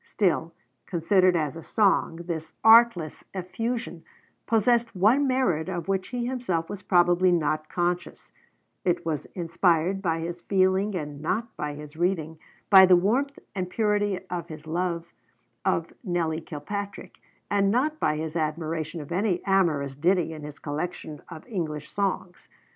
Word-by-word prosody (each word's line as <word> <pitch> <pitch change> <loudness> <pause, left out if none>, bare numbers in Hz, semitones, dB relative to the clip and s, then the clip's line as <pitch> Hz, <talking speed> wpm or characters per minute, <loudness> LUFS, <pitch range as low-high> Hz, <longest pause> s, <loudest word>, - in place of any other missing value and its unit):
Still, 170 -4 0 0.4
considered 180 +1 +3
as 155 -2 -1
a 165 - -7
song, 195 -2 +2
this 160 -2 -5
artless 225 -8 +5
effusion 225 0 -4 0.4
possessed 230 0 +2
one 230 +10 +4
merit 190 -11 +1
of 175 -1 -4
which 190 -1 -1
he 245 -2 -3
himself 240 -11 -2
was 205 -1 -6
probably 175 0 +4
not 155 -2 0
conscious: 175 0 -2 0.5
it 175 -2 0
was 155 -4 -2
inspired 170 +1 +1
by 165 -4 0
his 170 +1 -5
feeling 190 +2 +2
and 145 -4 -5
not 220 +8 -2
by 150 -1 -4
his 150 0 -10
reading, 165 -3 -1 0.3
by 190 -1 +10
the 180 - +7
warmth 245 +11 +1 0.2
and 185 -2 -3
purity 205 -1 +1
of 175 -2 -4
his 155 -1 -9
love 170 +1 -2 0.5
of - - 0
Nelly 170 -4 -1
Kilpatrick, 200 +7 -6 0.3
and 200 -1 +3
not 295 +8 +1
by 150 - +1
his 160 +1 -4
admiration 160 0 -2
of 145 - -11
any 185 0 0
amorous 165 -8 +2
ditty 165 +3 +1
in 155 - -8
his 150 -1 -8
collection 155 0 -5
of 160 -3 -10
English 155 - -4
songs. 190 -2 -3
175 Hz, 150 wpm, -26 LUFS, 160-200 Hz, 0.5 s, by